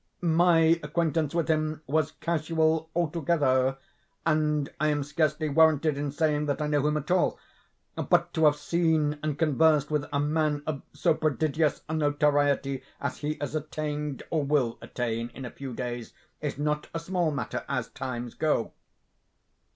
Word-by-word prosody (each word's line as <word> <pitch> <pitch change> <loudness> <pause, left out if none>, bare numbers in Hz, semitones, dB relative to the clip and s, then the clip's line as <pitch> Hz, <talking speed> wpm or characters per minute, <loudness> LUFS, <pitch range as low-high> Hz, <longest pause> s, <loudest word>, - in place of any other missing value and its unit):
My 165 -1 +4
acquaintance 160 0 0
with 170 -2 +1
him 155 -1 0
was 155 +2 0
casual 160 0 0
altogether; 145 -6 +1 0.5
and 150 -2 +1
I 155 - +2
am 145 -1 +1
scarcely 155 +1 0
warranted 155 0 +4
in 145 0 -2
saying 150 0 +1
that 145 - -1
I 150 - 0
know 150 -1 +1
him 150 0 +1
at 150 +3 -4
all; 185 -1 +2 0.7
but - - +3
to 160 - +3
have 150 -1 +6
seen 155 -1 +1
and 155 -2 -2
conversed 155 -1 +3
with 150 -1 0
a 145 - 0
man 150 0 0
of 145 -3 -3
so - - +2
prodigious 155 0 0
a 160 - -4
notoriety 145 -3 +1 0.2
as 140 - -3
he 150 +1 -2
has 145 -1 -4
attained, 150 -2 -3
or 155 -3 +1
will 135 -5 +1
attain 115 -1 -3
in 135 - -7
a 125 - -6
few 135 -2 -7
days, 120 -1 -5 0.3
is 150 -3 -3
not 150 +1 -1
a - - 0
small 175 0 0
matter, 145 - -3
as 125 -4 -1
times 125 -3 -5
go. 155 -7 0
150 Hz, 160 wpm, -27 LUFS, 145-160 Hz, 0.7 s, have